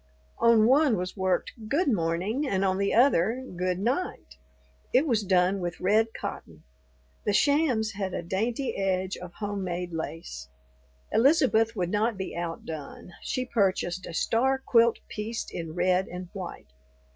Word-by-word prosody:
On 230 -2 +5
one 265 -1 +4
was 180 +1 -4
worked, 190 -2 0 0.2
"Good 295 +9 +1
Morning"; 205 - 0
on 190 0 +1
the 200 0 +1
other, 240 0 +3
"Good 180 0 -1
Night"; 250 - -2 0.5
it 265 +5 +4
was 235 -7 +2
done 185 0 +2
with 175 -1 -4
red 215 +4 +3
cotton. - - -7 0.6
The 205 - 0
shams 270 -4 +2
had 195 -2 -3
a - - -3
dainty 225 +9 -2
edge 190 -1 -1
of 175 -1 -9
homemade 180 -4 -4
lace. 160 - -6 0.6
Elizabeth 235 -4 +3
would 180 -3 -1
not 215 +1 +1
be 190 - -5
outdone; 165 -1 -6
she 255 - -2
purchased 190 -5 0
a - - -7
star 260 +9 +2
quilt 235 -3 +3
pieced 220 +2 -5
in 165 -2 -5
red 180 +1 +2
and 180 0 -7
white. 175 - -8
195 Hz, 145 wpm, -27 LUFS, 180-230 Hz, 0.6 s, On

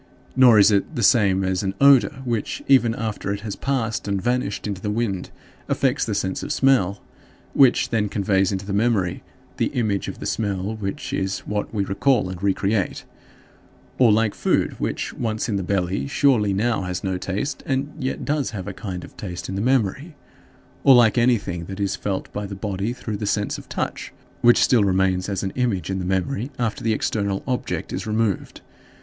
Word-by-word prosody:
Nor 125 -4 +7
is 100 +1 +6
it 100 +10 0
the 120 - -1
same 95 -4 +4
as 95 -1 0
an 95 -1 -2
odor 135 -1 +5
which, 115 -4 -2
even 120 -4 +4
after 110 -3 -3
it 100 0 -3
has 105 -2 -5
passed 125 -7 -2
and 100 -1 0
vanished 120 -2 -1
into 100 -3 -4
the 105 - -2
wind, 105 -4 -2 0.4
affects - - +1
the - - -2
sense 95 0 -2
of - - -5
smell 105 -8 +2 0.5
which 135 -3 +4
then 105 -3 +1
conveys 95 -1 +1
into 95 0 -3
the 100 - -4
memory 100 -4 +1 0.4
the - - +1
image 105 -5 -1
of - - -6
the - - -7
smell 100 -1 -2
which 95 -2 -5
is 95 0 -1
what 105 -1 -3
we 100 -3 -1
recall 105 +1 +1
and 90 -1 -8
re 100 0 +3
create; 100 -1 -1 0.9
or 120 -4 +6
like 110 0 +2
food - - +1
which, - - -2
once 110 -2 -2
in 110 - -1
the - - -1
belly, 90 -5 -1
surely 115 - +3
now 110 +4 0
has 90 -1 -4
no 95 -2 -1
taste 95 +8 -3
and 140 +2 -1
yet 130 -2 -3
does 145 -2 0
have 100 -4 -6
a 100 - -4
kind 90 -4 -6
of - - -12
taste 90 -4 -6
in - - -3
the 95 - -2
memory; 130 - 0 0.7
or 135 - +8
like 115 -3 +5
anything 110 -8 +1
that 95 +2 -7
is 100 -1 0
felt 95 -2 -4
by 105 -1 -4
the 100 - -6
body 100 +2 -3
through 115 -4 -5
the 105 - -4
sense 105 0 -1
of - - -14
touch, - - -4 0.3
which 120 0 +6
still 120 -5 +4
remains 95 -1 +1
as 95 -2 -2
an 95 - -2
image 100 -8 -1
in 95 - -2
the 90 - -3
memory 100 +8 -1
after 115 -3 -2
the 115 - +1
external 100 -2 -1
object 125 -2 -3
is - - -4
removed. 110 -2 -1
105 Hz, 200 wpm, -23 LUFS, 95-120 Hz, 0.9 s, or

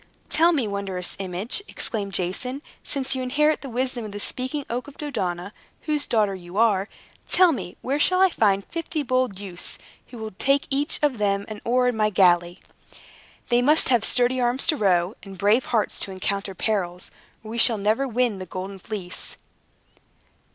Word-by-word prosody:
"Tell 330 +2 +4
me, 275 -9 0
wondrous 195 -3 -3
image," 195 - -2
exclaimed 200 -4 -3
Jason, 250 - -2 0.2
"since 270 -2 -1
you 260 - -2
inherit 300 +4 +1
the 275 - -7
wisdom 250 0 -2
of 215 - -7
the 205 - -6
Speaking 260 +6 -3
Oak 245 +4 -4
of 285 - -13
Dodona, 190 - -3 0.3
whose 300 -2 0
daughter 210 -4 +2
you 180 0 -9
are, 210 -3 +3 0.4
tell 360 -1 +5
me, 240 - -5
where 275 +3 -1
shall 365 +4 +3
I 380 0 +6
find 200 -6 +2
fifty 330 -2 -3
bold 255 -6 0
youths, 185 -3 -2 0.3
who 245 - -11
will 220 -1 -6
take 275 +1 +2
each 285 +3 +1
of 275 -6 +1
them 200 -1 +1
an 215 -1 -8
oar 250 +1 +2
of - - -1
my 215 -1 +2
galley? 175 -2 +3 0.9
They 240 -1 +4
must 300 +3 +4
have 240 -4 +4
sturdy 250 +2 +3
arms 245 +2 +2
to 325 - +3
row, 185 -5 +2
and 195 -1 -11
brave 210 +7 +3
hearts 225 -3 0
to 195 - +1
encounter 195 +1 -2
perils, 180 -4 -1 0.3
or 220 - -8
we 235 - -3
shall 230 -1 +6
never 215 +7 +1
win 240 -4 0
the 185 - -7
Golden 190 +2 -6
Fleece." 185 -3 -6
220 Hz, 180 wpm, -24 LUFS, 195-260 Hz, 0.9 s, I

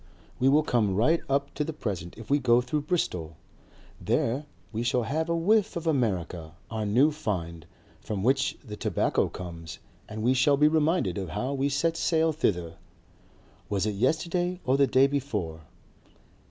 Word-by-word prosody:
We 130 - +4
will 150 +3 +4
come 110 -9 +1
right 155 - +3
up 140 +1 0
to 150 - -1
the 160 +1 -4
present 95 - -5
if 115 -1 -10
we 145 +3 +3
go 120 -3 +4
through 125 +5 -1
Bristol. 85 - -1 0.7
There 135 +6 0 0.3
we 110 - -2
shall 120 +1 +1
have 155 +8 -2
a 170 - +1
whiff 205 +5 +2
of 170 -1 -4
America, 90 - -1 0.2
our 110 -2 -2
new 130 +9 +4
find, 85 - -4 0.3
from 100 -3 -4
which 135 +3 +2
the 105 -3 -7
tobacco - - 0
comes, 85 -2 -8 0.3
and 110 0 -5
we 125 +3 +4
shall 140 +2 +3
be 150 +1 +5
reminded 155 - +1
of 95 -3 -5
how 125 - -2
we 140 +1 0
set 165 +4 0
sail 160 -1 +2
thither 90 - -1 0.9
was 100 -1 0
it 105 - -1
yesterday 170 - 0
or 130 - +3
the 140 0 +4
day 130 +1 +5
before? 105 - -3
130 Hz, 170 wpm, -27 LUFS, 100-150 Hz, 0.9 s, be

